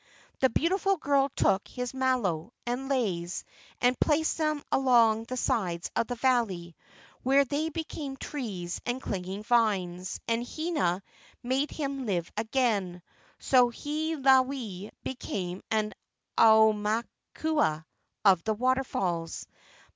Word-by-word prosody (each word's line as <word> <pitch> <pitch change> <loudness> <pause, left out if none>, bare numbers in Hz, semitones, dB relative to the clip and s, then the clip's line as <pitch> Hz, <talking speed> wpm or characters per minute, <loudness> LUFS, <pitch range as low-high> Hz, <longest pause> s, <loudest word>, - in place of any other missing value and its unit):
The 260 - +4
beautiful 385 - +1
girl 280 -2 +2
took 195 - +2
his 250 0 -5
malo 240 -8 0
and 250 +3 -3
leis 185 -10 -1 0.4
and 250 0 +2
placed 315 +1 +2
them 305 -2 0
along 230 -4 +4
the 255 +2 -5
sides 175 -8 -1
of 230 - +1
the 245 - -3
valley, 225 -10 0 0.5
where 275 +2 +4
they 295 +5 -1
became 305 -4 -5
trees 200 -13 -5
and 245 +1 -2
clinging 190 -3 -4
vines, 195 -6 +1
and 230 +1 +1
Hina 245 - -1 0.4
made 265 +4 0
him 275 -4 -4
live 175 -4 -1
again; 215 -6 0 0.3
so 250 -2 +4
Hiilawe 265 - +1
became 185 -8 -4
an 215 -1 0 0.4
aumakua 220 - +2 0.4
of 190 -4 +5
the 220 -1 0
waterfalls. 205 -9 -1
240 Hz, 115 wpm, -28 LUFS, 195-270 Hz, 0.5 s, of